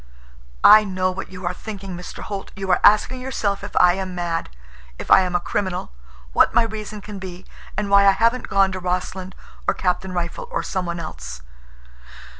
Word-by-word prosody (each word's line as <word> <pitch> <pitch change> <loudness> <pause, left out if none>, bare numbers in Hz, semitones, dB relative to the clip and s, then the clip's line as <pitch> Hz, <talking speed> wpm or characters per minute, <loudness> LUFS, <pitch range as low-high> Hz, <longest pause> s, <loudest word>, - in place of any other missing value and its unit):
"I 215 0 +9
know 185 -2 -1
what 190 +1 -7
you 185 -1 -8
are 175 - -1
thinking, 195 -2 -7
Mr. 180 0 -8
Holt. 200 -2 -6
You 195 -1 -2
are 180 - +4
asking 245 +5 +4
yourself 205 -7 -2
if 205 - -8
I 180 -1 +6
am 190 -1 -4
mad, 170 -2 -2 0.5
if - - -6
I - - +8
am 180 -1 -2
a - - +3
criminal, 180 - -3 0.4
what - - +4
my 235 - +6
reason 215 -1 -6
can 205 -1 -8
be, 185 -1 -8 0.3
and 210 0 -1
why 200 0 +6
I 195 - +7
haven't 230 +4 +1
gone 195 -1 +3
to 185 - -4
Rossland, 185 +1 -3 0.3
or - - +2
Captain 185 0 -1
Rifle, 175 - -4
or - - -2
some 185 -2 -3
one 170 0 -3
else. 60 - -7
190 Hz, 195 wpm, -22 LUFS, 180-205 Hz, 0.5 s, I